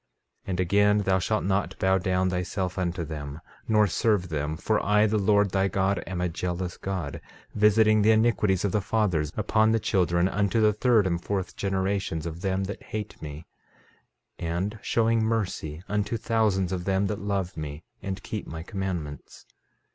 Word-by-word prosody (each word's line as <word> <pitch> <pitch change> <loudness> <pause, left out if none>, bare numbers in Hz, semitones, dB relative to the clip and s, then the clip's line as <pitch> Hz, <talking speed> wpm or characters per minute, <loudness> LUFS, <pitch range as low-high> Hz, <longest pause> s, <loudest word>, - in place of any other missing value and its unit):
13:13 - - -9
And 90 -1 -1
again: 100 +3 +4
Thou 95 -2 +2
shalt 105 +4 0
not 95 0 0
bow 95 0 +2
down 95 0 +1
thyself 90 +1 -2
unto 90 -1 -1
them, 75 -1 -6 0.3
nor 105 -1 +4
serve 100 -1 +1
them; 75 0 -2
for - - 0
I 105 +2 +4
the 110 0 +1
Lord 100 0 +3
thy 95 0 +2
God 95 0 0
am 95 -2 -3
a 90 - +1
jealous 90 +1 -3
God, 90 -7 -4 0.3
visiting 110 0 +4
the 105 - +4
iniquities 110 -4 +3
of 100 - 0
the 105 - +1
fathers 90 -8 0
upon 110 +1 +3
the 115 - +2
children, 85 -3 +2
unto 100 +3 +1
the 105 -1 +4
third 110 -1 +3
and 85 -2 -1
fourth 95 -3 -3
generations 95 -4 -1
of 85 +1 -6
them 95 0 0
that 100 +2 -5
hate 105 -1 -6
me; 75 +1 -7 0.9
13:14 85 - -3
And 95 +6 -2
showing 115 -1 +2
mercy 90 -8 -2
unto 105 +2 -1
thousands 105 -5 +1
of 90 -2 -3
them 95 0 +1
that 105 0 -2
love 100 -2 -2
me 75 0 -6 0.2
and 95 -1 -5
keep 105 - -5
my 80 0 -6
commandments. 90 - -5
95 Hz, 175 wpm, -26 LUFS, 90-105 Hz, 0.9 s, again